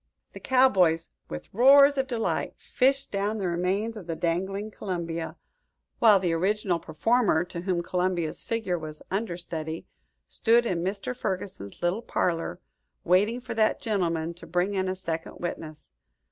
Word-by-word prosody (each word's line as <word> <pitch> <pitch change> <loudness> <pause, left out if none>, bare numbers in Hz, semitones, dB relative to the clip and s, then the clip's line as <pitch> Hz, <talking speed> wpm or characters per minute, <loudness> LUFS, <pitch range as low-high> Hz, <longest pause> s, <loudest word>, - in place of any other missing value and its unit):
The - - -8
cowboys, 185 - +3 0.2
with 75 - -8
roars 275 +5 +7
of 270 -1 0
delight, 235 -3 -1
fished 275 +1 +1
down 205 +2 -1
the 195 -3 -1
remains 185 +6 -1
of 195 -6 -9
the 165 - -2
dangling 190 +6 -2
Columbia, 170 -5 -4 0.6
while 220 -4 +7
the 180 -3 0
original 185 +1 +1
performer, 190 +2 +2
to 175 -1 -6
whom 180 -2 -1
Columbia's 180 -3 -1
figure 215 -7 -2
was 155 -1 -8
understudy, 170 -5 -4 0.4
stood 235 +1 +3
in 175 -6 -1
Mr. 200 +6 -3
Ferguson's 185 - -5
little 175 +6 +1
parlor, 165 -7 -1 0.4
waiting 205 +7 +3
for 245 -1 -6
that 220 -1 +2
gentleman 170 -7 -1
to 170 -1 -13
bring 180 +4 0
in 190 -1 0
a 185 - -1
second 165 -3 -5
witness. 155 - -6
185 Hz, 145 wpm, -27 LUFS, 170-220 Hz, 0.6 s, roars